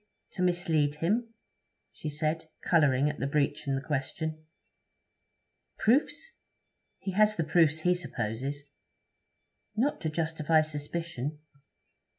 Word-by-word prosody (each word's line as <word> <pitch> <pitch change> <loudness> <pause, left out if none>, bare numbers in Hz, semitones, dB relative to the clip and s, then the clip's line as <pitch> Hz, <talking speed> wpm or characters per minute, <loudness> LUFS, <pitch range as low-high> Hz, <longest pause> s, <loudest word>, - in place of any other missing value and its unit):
to - - -5
mislead 165 -5 +2
him?' 220 +9 0 0.6
she 155 - -5
said, 155 +2 -1 0.2
colouring 145 -5 +4
at 150 0 -3
the 140 - 0
breach 145 +1 0
in 135 - +1
the 135 - -2
question. 155 +2 -3 1.3
'Proofs? 290 - +1 0.6
He 190 - -4
has 215 +2 +4
the 165 - 0
proofs 160 -1 +3
he 180 +2 +4
supposes.' 135 -3 -3 1.1
'Not 260 +7 +1
to 160 - 0
justify 160 0 +2
suspicion?' 150 -1 -4
155 Hz, 115 wpm, -29 LUFS, 145-175 Hz, 1.3 s, colouring